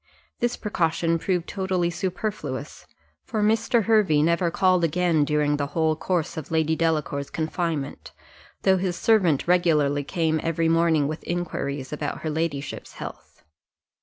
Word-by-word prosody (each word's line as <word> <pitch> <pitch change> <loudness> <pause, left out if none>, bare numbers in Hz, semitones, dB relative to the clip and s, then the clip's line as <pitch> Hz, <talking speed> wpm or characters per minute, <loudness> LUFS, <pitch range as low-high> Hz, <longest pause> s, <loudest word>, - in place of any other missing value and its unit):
This 240 0 0
precaution 165 -4 0
proved 180 -1 -1
totally 185 -3 -1
superfluous, 170 -6 -4 0.4
for 220 -5 -2
Mr. 225 +2 +2
Hervey 195 -9 +3
never 170 +2 +2
called 185 0 +2
again, 165 -1 +2
during 150 0 +1
the 145 -1 -1
whole 160 -1 +2
course 170 0 -2
of 155 - -6
Lady 160 0 +1
Delacour's 150 -4 -1
confinement, 160 -2 -3 0.5
though 190 0 +4
his 180 -1 -1
servant 180 -12 +2
regularly 150 -5 +3
came 160 0 0
every 165 0 0
morning 165 -3 +3
with 155 +2 -5
inquiries 145 -6 -3
after 150 -1 -3
her 155 - -4
ladyship's 150 -3 -3
health. - - -10
165 Hz, 135 wpm, -25 LUFS, 150-180 Hz, 0.5 s, though